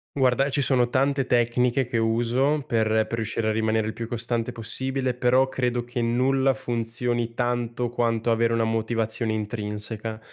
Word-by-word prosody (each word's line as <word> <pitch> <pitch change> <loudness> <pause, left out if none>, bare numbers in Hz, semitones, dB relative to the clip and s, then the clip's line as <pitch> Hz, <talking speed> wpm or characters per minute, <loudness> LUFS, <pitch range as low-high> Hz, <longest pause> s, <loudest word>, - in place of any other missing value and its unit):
Guarda, 135 0 +2
ci 140 +1 0
sono 125 -3 +3
tante 135 +1 +1
tecniche 125 +2 +2
che 120 -1 -2
uso 120 +6 +1
per 115 -1 +1
per 110 +1 +1
riuscire 110 0 -1
a - - +2
rimanere 110 0 +1
il 110 - -3
più 115 - -5
costante 115 0 -2
possibile, 130 +3 -2
però 125 +2 +3
credo 125 -2 -1
che 120 +1 -4
nulla 130 +3 +2
funzioni 120 -1 -2
tanto 120 0 -1
quanto 115 -1 0
avere 115 0 +2
una 115 0 +2
motivazione 110 0 -1
intrinseca. 110 0 -4
120 Hz, 155 wpm, -25 LUFS, 115-125 Hz, -, sono